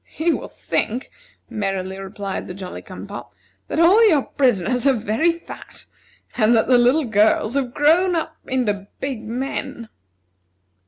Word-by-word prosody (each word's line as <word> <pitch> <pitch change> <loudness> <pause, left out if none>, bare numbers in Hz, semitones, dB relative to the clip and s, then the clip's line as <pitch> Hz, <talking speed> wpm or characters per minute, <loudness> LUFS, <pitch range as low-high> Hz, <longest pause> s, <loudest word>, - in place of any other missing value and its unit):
"He 330 +2 0
will - - -4
think," 245 +4 -2 0.4
merrily 195 -2 -3
replied 195 0 -5
the 180 - -7
Jolly 185 -1 -7
cum - - -9
pop, - - -9 0.3
"that - - -2
all 370 +7 +6
your 295 -7 +3
prisoners 245 0 +1
are 275 - +5
very 225 +8 +1
fat, 335 0 -11 0.5
and 235 0 +4
that 220 - +2
the 250 -1 +5
little 260 +5 +3
girls 215 0 +2
have 270 -3 -1
grown 345 +5 +4
up 325 - -2
into 210 -7 -1
big 265 -4 -3
men." 250 0 -5
245 Hz, 150 wpm, -21 LUFS, 210-285 Hz, 0.5 s, all